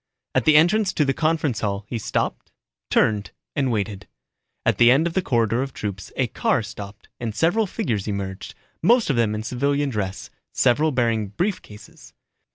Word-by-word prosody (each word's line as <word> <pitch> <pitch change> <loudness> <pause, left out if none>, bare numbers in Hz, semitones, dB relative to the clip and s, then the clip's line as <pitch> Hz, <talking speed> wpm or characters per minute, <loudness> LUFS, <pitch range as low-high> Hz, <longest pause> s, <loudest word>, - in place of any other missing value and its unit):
At - - +1
the 155 - +6
entrance 190 +5 +3
to 150 - +2
the 135 - +1
conference 155 -6 0
hall 100 -1 -2
he 120 - -3
stopped, - - -2 0.4
turned 105 -2 +2 0.3
and 135 -4 +1
waited. 100 -2 -3 0.6
At - - +2
the 120 - +7
end 140 +6 +4
of 170 - -1
the 190 - +1
corridor 115 - +1
of 135 -1 -4
troops 100 -3 -5
a - - +1
car - - 0
stopped 100 +1 -9
and 115 -3 -4
several 195 - +2
figures 120 - -2
emerged, 95 -2 -5 0.3
most 230 -1 +4
of - - 0
them 115 -2 +1
in 105 - -4
civilian 140 +4 0
dress, 100 -4 -4 0.2
several 145 +5 +3
bearing 115 -5 +1
brief 180 - -2
cases. 105 0 -15
120 Hz, 175 wpm, -23 LUFS, 105-155 Hz, 0.6 s, the